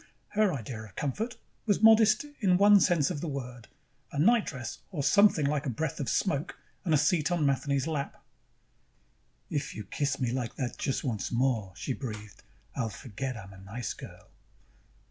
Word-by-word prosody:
Her 210 -2 +2
idea 120 -5 -5
of 100 - -16
comfort 220 - -3 0.3
was 205 0 +2
modest 220 +2 +6
in 185 -6 +4
one 205 +1 +7
sense 165 -3 +3
of 145 -5 -4
the 170 - -3
word: 125 -5 -6 0.4
a - - -6
nightdress 155 - +1
or 150 -7 -2
something, 185 0 +5
like 145 0 0
a - - +1
breath 140 +5 -3
of 140 - -2
smoke, 155 -4 0 0.3
and 175 - -1
a 155 - +6
seat 155 +2 +2
on 170 -4 +2
Matheny's 140 0 +1
lap. 150 -4 -3 1.3
"If 145 -1 -2
you 105 - -5
kiss 140 +6 -2
me 125 -3 0
like 125 -2 -3
that 125 -2 -4
just 135 - -1
once 115 -6 -2
more," 120 -5 +1
she 130 +7 -3
breathed, 105 -6 -7 0.3
"I'll 115 - -1
forget 130 +2 -5
I'm 100 -2 -10
a 95 - -13
nice 100 +4 -5
girl." - - -12
140 Hz, 175 wpm, -29 LUFS, 120-175 Hz, 1.3 s, one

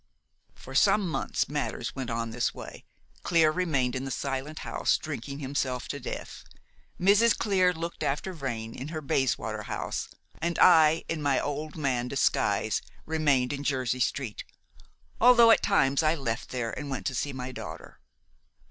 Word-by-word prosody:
"For - - -11
some 205 -3 +4
months 165 - -1
matters 145 -4 -3
went 130 -3 -4
on 115 0 -2
in - - -8
this 120 +1 -1
way. - - -10 0.4
Clear 165 -3 +3
remained 145 -8 0
in 130 - -3
the 135 - -4
Silent 135 +3 -3
House, - - +1
drinking 140 +4 -6
himself 130 -3 -2
to 140 - -4
death; - - -7 0.6
Mrs. 205 +5 +4
Clear 185 -4 +3
looked 170 0 -6
after 150 +7 -1
Vrain 120 -8 -4
in 130 - -6
her 155 0 -4
Bayswater 135 -3 -1
house; - - -4 0.3
and 170 0 -1
I, 160 -2 +6
in 165 -2 -3
my 140 -2 +2
old 150 +1 -4
man 130 -5 -1
disguise, - - +1 0.2
remained 145 -5 +1
in 140 0 -4
Jersey 130 -3 0
Street, 125 -3 -2 0.8
although 235 -1 +7
at - - +5
times 135 +2 +3
I 155 +1 +2
left 115 -7 -3
there 120 -3 -3
and 145 - -6
went 135 - -4
to - - -1
see 140 +3 -2
my 130 -1 -5
daughter. - - -9
140 Hz, 165 wpm, -28 LUFS, 130-160 Hz, 0.8 s, although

